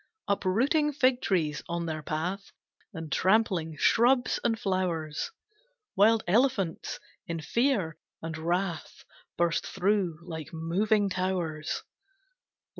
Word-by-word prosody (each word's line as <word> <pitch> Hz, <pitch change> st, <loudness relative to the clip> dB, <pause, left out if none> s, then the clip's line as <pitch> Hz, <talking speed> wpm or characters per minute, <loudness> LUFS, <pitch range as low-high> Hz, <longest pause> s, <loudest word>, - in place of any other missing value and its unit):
Uprooting 260 Hz, -, +2 dB
fig 255 Hz, -2 st, +3 dB
trees 155 Hz, -6 st, 0 dB
on 170 Hz, 0 st, -2 dB
their 155 Hz, -1 st, -3 dB
path, 175 Hz, +7 st, -3 dB, 0.4 s
And 160 Hz, -4 st, -7 dB
trampling 185 Hz, -6 st, +2 dB
shrubs 245 Hz, -, +3 dB
and 225 Hz, -2 st, +1 dB
flowers, 175 Hz, -6 st, -1 dB, 0.7 s
Wild 220 Hz, +3 st, +5 dB
elephants, 200 Hz, -4 st, +1 dB, 0.3 s
in 165 Hz, -1 st, -3 dB
fear 200 Hz, -, 0 dB, 0.2 s
and 160 Hz, 0 st, -5 dB
wrath, 170 Hz, +1 st, -2 dB, 0.3 s
Burst 170 Hz, -1 st, +1 dB
through, 190 Hz, -3 st, 0 dB
like 160 Hz, -3 st, -7 dB
moving 200 Hz, +6 st, +1 dB
towers. 180 Hz, -5 st, -2 dB
185 Hz, 105 wpm, -29 LUFS, 165-215 Hz, 0.7 s, Wild